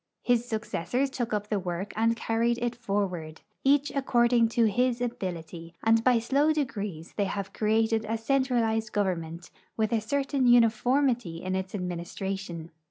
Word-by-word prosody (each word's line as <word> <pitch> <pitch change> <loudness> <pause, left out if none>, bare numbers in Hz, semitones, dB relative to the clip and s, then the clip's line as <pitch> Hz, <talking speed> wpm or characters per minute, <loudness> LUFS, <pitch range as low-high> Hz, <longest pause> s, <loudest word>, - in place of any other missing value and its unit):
His 240 -1 +2
successors 245 +3 -2
took 240 -3 -3
up 210 -1 -2
the 205 -3 0
Avork 180 +3 -4
and 225 +2 +2
carried 230 +1 0
it 240 0 -1
forward, 195 -8 -3 0.2
each 280 +1 +3
according 240 -3 +3
to 230 0 +2
his 245 +3 +1
ability, 170 -8 -5
and 225 0 +4
by 250 -1 +5
sIoav 280 +7 +2
degrees 205 - -4
they 200 - +2
have 195 0 -4
created 220 +1 +1
a 225 - 0
centralized 225 -3 0
government, 175 -4 -2 0.3
Avith 220 -1 +1
a 220 - 0
certain 275 +2 0
uniformity 240 -4 +3
in 185 0 -2
its 190 +1 -3
administration. 180 -1 -5
225 Hz, 150 wpm, -28 LUFS, 190-245 Hz, 0.3 s, by